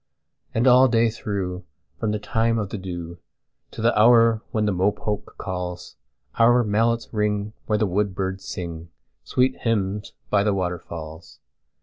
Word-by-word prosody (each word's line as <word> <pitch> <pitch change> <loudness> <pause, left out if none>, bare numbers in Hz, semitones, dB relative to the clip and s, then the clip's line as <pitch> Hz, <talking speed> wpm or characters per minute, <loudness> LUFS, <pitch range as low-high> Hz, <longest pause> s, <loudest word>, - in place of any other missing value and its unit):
And 115 +3 +2
all 130 +1 +7
day 115 -1 +3
through, 95 -4 -4 0.4
from 110 - -1
the 105 - 0
time 115 +2 0
of 105 -3 -2
the 105 - -5
dewTo 85 +4 -10
the 120 - +3
hour 115 0 +5
when 110 -1 0
the 105 - +2
mopoke 105 +2 -1
calls, 90 -1 -5 0.4
Our 120 +1 +5
mallets 115 +3 0
ring 105 0 -1
where 105 - +2
the 110 - +2
woodbirds 95 -1 -2
singSweet 85 - -3
hymns 105 -3 -1 0.2
by 100 -1 +4
the 105 -1 +1
waterfalls. 85 -3 -6
105 Hz, 135 wpm, -23 LUFS, 90-115 Hz, 0.4 s, all